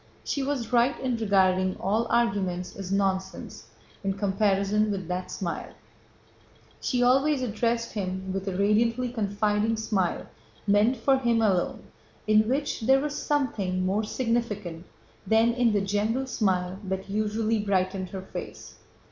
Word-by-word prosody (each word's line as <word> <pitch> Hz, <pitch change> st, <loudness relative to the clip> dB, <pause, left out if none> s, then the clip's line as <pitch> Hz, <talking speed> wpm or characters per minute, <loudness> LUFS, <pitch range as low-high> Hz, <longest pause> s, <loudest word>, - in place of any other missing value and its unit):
She 280 Hz, -, -2 dB
was 265 Hz, -4 st, -2 dB
right 245 Hz, +3 st, +3 dB
in 255 Hz, -2 st, -1 dB
regarding 185 Hz, -3 st, +2 dB
all 220 Hz, +5 st, 0 dB
arguments 195 Hz, -6 st, 0 dB
as 195 Hz, -1 st, -6 dB
nonsense 190 Hz, -1 st, -2 dB, 0.4 s
in 195 Hz, 0 st, 0 dB
comparison 200 Hz, +1 st, +1 dB
with 190 Hz, -4 st, -3 dB
that 180 Hz, 0 st, -3 dB
smile. 175 Hz, -3 st, -4 dB, 1.1 s
She 245 Hz, -1 st, 0 dB
always 270 Hz, +2 st, +3 dB
addressed 230 Hz, +1 st, -1 dB
him 190 Hz, -2 st, -3 dB
with 195 Hz, +1 st, -4 dB
a 185 Hz, -2 st, -2 dB
radiantly 230 Hz, +5 st, +2 dB
confiding 210 Hz, 0 st, 0 dB
smile 205 Hz, -5 st, -1 dB, 0.4 s
meant 210 Hz, +5 st, +3 dB
for 265 Hz, +4 st, +2 dB
him 235 Hz, -3 st, +2 dB
alone, 190 Hz, -5 st, +1 dB, 0.4 s
in 215 Hz, +1 st, +4 dB
which 285 Hz, +3 st, -1 dB
there 265 Hz, +4 st, +4 dB
was 290 Hz, +1 st, -3 dB
something 205 Hz, -13 st, -1 dB
more 200 Hz, +4 st, +1 dB
significant 210 Hz, -8 st, -2 dB, 0.4 s
than 225 Hz, +3 st, +4 dB
in 240 Hz, -1 st, +2 dB
the 205 Hz, -1 st, +2 dB
general 210 Hz, +6 st, 0 dB
smile 190 Hz, -6 st, -1 dB
that 190 Hz, 0 st, -3 dB
usually 215 Hz, +2 st, 0 dB
brightened 190 Hz, -2 st, 0 dB
her 190 Hz, 0 st, -6 dB
face. -, -, -8 dB
210 Hz, 140 wpm, -27 LUFS, 190-235 Hz, 1.1 s, in